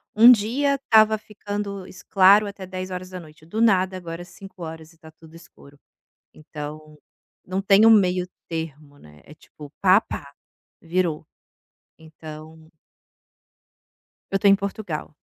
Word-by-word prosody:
1 230 Hz, +3 st, +8 dB
dia 250 Hz, +6 st, +2 dB
estava 220 Hz, -5 st, +4 dB
ficando 205 Hz, -2 st, -6 dB, 0.2 s
claro 200 Hz, +2 st, +6 dB
até 200 Hz, -1 st, -8 dB
10 185 Hz, 0 st, -7 dB
horas 185 Hz, 0 st, -6 dB
da 185 Hz, -1 st, -8 dB
noite, 155 Hz, -1 st, -17 dB
do 215 Hz, +7 st, -4 dB
nada 190 Hz, -4 st, +3 dB
agora 170 Hz, -1 st, -7 dB
5 190 Hz, 0 st, -13 dB
horas 160 Hz, 0 st, -9 dB
e -, -, -23 dB
está 160 Hz, 0 st, -15 dB
tudo 160 Hz, 0 st, -19 dB
escuro, 145 Hz, -4 st, -17 dB, 0.5 s
então 155 Hz, 0 st, -10 dB, 0.5 s
não 185 Hz, +1 st, -3 dB
tenho 200 Hz, +2 st, +5 dB
meio 185 Hz, -4 st, +3 dB, 0.2 s
termo, 155 Hz, -3 st, -7 dB
né, 75 Hz, -, -18 dB
é 150 Hz, -, -14 dB
tipo 150 Hz, -2 st, -14 dB
pá-pá, 185 Hz, -7 st, +1 dB, 0.5 s
virou, 165 Hz, -3 st, -2 dB, 0.7 s
então. 160 Hz, 0 st, -13 dB, 1.6 s
Eu 195 Hz, -, 0 dB
estou 200 Hz, +1 st, +4 dB
em -, -, +7 dB
Portugal. 195 Hz, -6 st, -5 dB
185 Hz, 135 wpm, -23 LUFS, 155-200 Hz, 1.6 s, 1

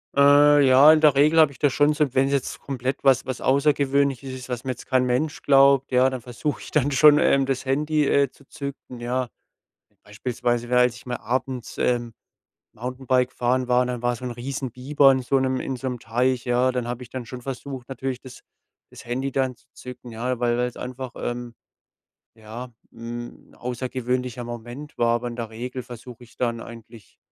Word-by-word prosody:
Äh, 145 Hz, +1 st, +6 dB
ja, 135 Hz, +4 st, +8 dB
in 155 Hz, -, +5 dB
der 150 Hz, -3 st, +5 dB
Regel 150 Hz, +4 st, +4 dB
habe 155 Hz, -3 st, +5 dB
ich 125 Hz, -, -19 dB
das 145 Hz, -, +3 dB
schon 145 Hz, +1 st, +3 dB
so. 150 Hz, -3 st, 0 dB
Wenn's 135 Hz, 0 st, 0 dB
komplett 130 Hz, -1 st, -3 dB
was 135 Hz, -1 st, +4 dB
was 130 Hz, -2 st, -4 dB
Außergewöhnliches 140 Hz, -1 st, +1 dB
ist, 130 Hz, 0 st, -9 dB
was 125 Hz, -1 st, -4 dB
mir 130 Hz, -, -1 dB
jetzt 125 Hz, -, -9 dB
kein 130 Hz, -1 st, +2 dB
Mensch 130 Hz, +5 st, -1 dB
glaubt, 135 Hz, -1 st, +4 dB
ja, 130 Hz, +1 st, +4 dB
dann 130 Hz, -1 st, -5 dB
versuche 125 Hz, +5 st, -4 dB
ich -, -, -10 dB
dann 145 Hz, -1 st, +1 dB
schon, 145 Hz, +2 st, +7 dB
ähm, 140 Hz, -2 st, +3 dB
das 130 Hz, -1 st, -2 dB
Handy, 150 Hz, +3 st, +1 dB
äh, 140 Hz, -1 st, +3 dB
zu 140 Hz, -, -23 dB
zücken, 140 Hz, -3 st, -8 dB
ja. 125 Hz, +1 st, -2 dB, 0.7 s
Beispielsweise 120 Hz, +2 st, -3 dB
wärend 125 Hz, -1 st, +3 dB
ich 120 Hz, -, -13 dB
mal 125 Hz, -1 st, -3 dB
abends, 130 Hz, +1 st, -3 dB
ähm, 120 Hz, -2 st, -1 dB, 0.6 s
Mountainbike 125 Hz, +1 st, -1 dB
fahren 125 Hz, +1 st, 0 dB
war, 125 Hz, 0 st, +3 dB
dann 125 Hz, -1 st, -4 dB
war 120 Hz, 0 st, 0 dB
so 125 Hz, -, -8 dB
'n 125 Hz, -, -3 dB
Riesen 130 Hz, +2 st, -5 dB
Bieber 135 Hz, +3 st, +3 dB
in 130 Hz, -, -1 dB
so 135 Hz, +2 st, +1 dB
'nem 130 Hz, -1 st, 0 dB
in 130 Hz, -, -4 dB
so 130 Hz, -, -5 dB
'nem 125 Hz, -1 st, -4 dB
Teich, 125 Hz, +2 st, 0 dB
ja? 125 Hz, +1 st, +2 dB
Dann 125 Hz, -2 st, -2 dB
habe 120 Hz, +1 st, -5 dB
ich -, -, -14 dB
dann 130 Hz, -2 st, -6 dB
schon 125 Hz, +1 st, -8 dB
versucht, 135 Hz, 0 st, -7 dB
natürlich 130 Hz, -1 st, -4 dB
das 130 Hz, -1 st, -13 dB, 0.5 s
das -, -, -13 dB
Handy 130 Hz, +3 st, -2 dB
dann 130 Hz, -1 st, -1 dB
zu -, -, -30 dB
zücken, 125 Hz, -1 st, -10 dB
ja? 120 Hz, +2 st, -3 dB
Weil 120 Hz, -1 st, +1 dB
weil's 125 Hz, -1 st, -1 dB
einfach, 130 Hz, 0 st, -6 dB
ähm, 120 Hz, 0 st, -5 dB, 0.8 s
ja, 115 Hz, +3 st, -9 dB, 0.2 s
hm, 120 Hz, +1 st, -9 dB
'n -, -, -19 dB
außergewöhnlicher 125 Hz, 0 st, -3 dB
Moment 120 Hz, +5 st, -8 dB
war, 115 Hz, 0 st, +3 dB
aber 120 Hz, +1 st, -3 dB
in 120 Hz, -, -8 dB
der 115 Hz, -2 st, -4 dB
Regel 125 Hz, +3 st, -6 dB
versuche 120 Hz, 0 st, -11 dB
ich 115 Hz, -, -22 dB
dann 115 Hz, -2 st, -1 dB
eigentlich 115 Hz, -3 st, -13 dB
125 Hz, 200 wpm, -24 LUFS, 120-135 Hz, 0.8 s, ja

